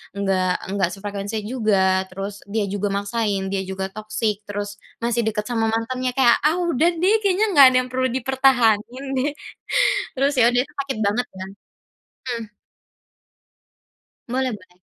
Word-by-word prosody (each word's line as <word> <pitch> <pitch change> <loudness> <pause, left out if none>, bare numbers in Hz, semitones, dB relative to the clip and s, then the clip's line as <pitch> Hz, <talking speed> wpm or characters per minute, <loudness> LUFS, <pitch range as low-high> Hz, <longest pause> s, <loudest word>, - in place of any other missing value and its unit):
nggak 190 -2 +1 0.2
nggak 190 -3 +1
sefrekuensi 205 +1 -5
juga 195 -6 +2
terus 195 +2 -6
dia 210 0 -1
juga 205 +1 -2
maksain, 200 -1 -1
dia 195 -1 0
juga 190 0 -4
toxic, 215 -1 -2
terus 205 0 -4 0.3
masih 235 0 +1
deket 210 -1 -1
sama 230 -2 0
mantannya 250 +3 -1
kayak, 240 -3 +5
ah, 320 +4 +3
udah 330 +3 +3
deh 355 +4 +2
kayaknya 400 +2 +3
nggak 280 -2 +10
ada 255 - +3
yang 255 - -7
perlu 260 0 +1
dipertahanin 255 -1 +2 0.2
deh. 290 - 0 0.8
Terus 275 +2 +1
ya 230 - +6
udah 245 0 +3
itu 295 - -18
sakit 270 - -3
banget 220 +5 0
kan. 190 +1 -6 0.9
Mmm. 225 -1 -8 1.8
Boleh 255 +1 0
boleh. 180 -3 -15
220 Hz, 150 wpm, -22 LUFS, 200-255 Hz, 1.8 s, nggak